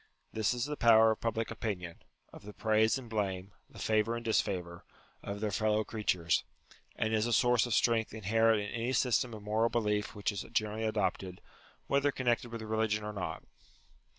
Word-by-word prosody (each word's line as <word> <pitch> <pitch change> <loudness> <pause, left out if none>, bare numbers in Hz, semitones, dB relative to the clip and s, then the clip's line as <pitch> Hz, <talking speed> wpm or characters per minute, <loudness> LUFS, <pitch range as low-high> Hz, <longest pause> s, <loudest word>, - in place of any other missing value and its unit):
This 110 +2 +1
is 120 +1 -1
the 150 0 -3
power 115 -3 +6
of 110 - -4
public 115 0 -2
opinion; 90 -6 -5 0.3
of - - -11
the 105 0 -10
praise 110 +2 +2
and 130 -2 -9
blame, 100 -3 -3 0.2
the - - -15
favour 110 +1 +1
and 115 0 -6
disfavour, 90 -6 -1 0.4
of 100 0 -6
their 105 -1 -1
fellow 110 +1 +1
creatures; 95 -7 0 0.5
and 110 0 -1
is 110 +1 +2
a - - -2
source 120 +1 +3
of 115 - 0
strength 115 -2 +2
inherent 110 +1 +2
in 105 - -5
any 120 +3 -2
system 125 -1 +2
of 105 - -10
moral 110 +2 +1
belief 105 -2 -1
which 105 +1 -1
is 100 - -4
generally 110 +1 -1
adopted, 95 -4 -2 0.5
whether 140 +1 +2
connected 120 -2 0
with 115 -1 -6
religion 110 -1 0
or 105 0 -5
not. 90 -5 -5
110 Hz, 180 wpm, -32 LUFS, 105-115 Hz, 0.5 s, power